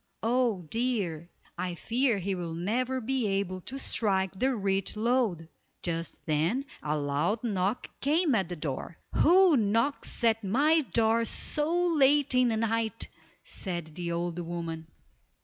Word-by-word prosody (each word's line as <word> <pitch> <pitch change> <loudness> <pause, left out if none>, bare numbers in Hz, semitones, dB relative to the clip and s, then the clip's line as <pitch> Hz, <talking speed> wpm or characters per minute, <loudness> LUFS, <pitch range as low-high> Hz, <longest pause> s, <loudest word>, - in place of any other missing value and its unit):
Oh, 230 -5 +1
dear! 200 -9 -1 0.3
I 180 -1 -2
fear 235 +4 +1
he 195 +1 -2
will 170 -3 -4
never 245 +9 -1
be 255 -1 -1
able 195 -2 -1
to 265 +9 -7
strike 195 -7 0
the 255 +7 +1
rich 195 -1 -1
lode." 220 -8 +1 0.4
Just 165 -1 -4
then 165 - +1 0.2
a 150 +1 -1
loud 150 +10 0
knock 200 0 0 0.2
came 305 +2 +2
at 195 -6 +1
the 175 - -4
door. 150 +1 -5 0.2
"Who 360 0 +6
knocks 230 +4 0
at 225 -1 +3
my 290 +11 +3
door 230 0 +3
so 295 +6 -2 0.2
late 285 -1 +4
in 255 0 +4
the 225 -2 +1
night," 225 0 -1 0.3
said 170 -5 -4
the 170 +1 -4
old 170 0 -2
woman. 165 -1 -5
210 Hz, 145 wpm, -29 LUFS, 175-250 Hz, 0.4 s, Who